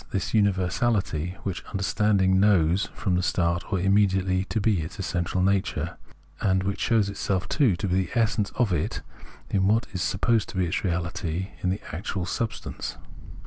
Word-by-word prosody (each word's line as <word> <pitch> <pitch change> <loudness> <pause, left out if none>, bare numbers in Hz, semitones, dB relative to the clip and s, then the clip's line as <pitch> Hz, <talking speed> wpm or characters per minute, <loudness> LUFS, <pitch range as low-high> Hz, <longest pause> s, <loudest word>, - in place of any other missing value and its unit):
this 95 -3 -2
universahty, 95 -3 +1
which 95 -3 -3
understanding 100 -1 +2
knows 95 -2 +3
from 95 - -1
the 90 - +2
start 85 +2 0
or 95 - +1
immediately 95 -1 +2
to 110 - -2
be 105 -4 +2
its 80 - -7
essential 90 -1 -1
nature, 100 0 0 0.5
and 95 -1 +2
which 100 +1 -2
shows 110 -3 +2
itself, 100 -1 -2
too, 130 - +3
to 85 - -3
be 95 +1 +1
the - - -11
essence 110 -2 +1
of 120 -7 +2
it - - -1 0.5
in 95 -1 +2
what 110 +3 +3
is 90 - -3
supposed 110 +5 +1
to - - -7
be 90 - +2
its 85 - -1
reaHty, 85 0 -2
in 90 - 0
the 95 +3 -1
actual 90 +1 -3
substances. 110 +5 -4
95 Hz, 170 wpm, -26 LUFS, 90-100 Hz, 0.5 s, knows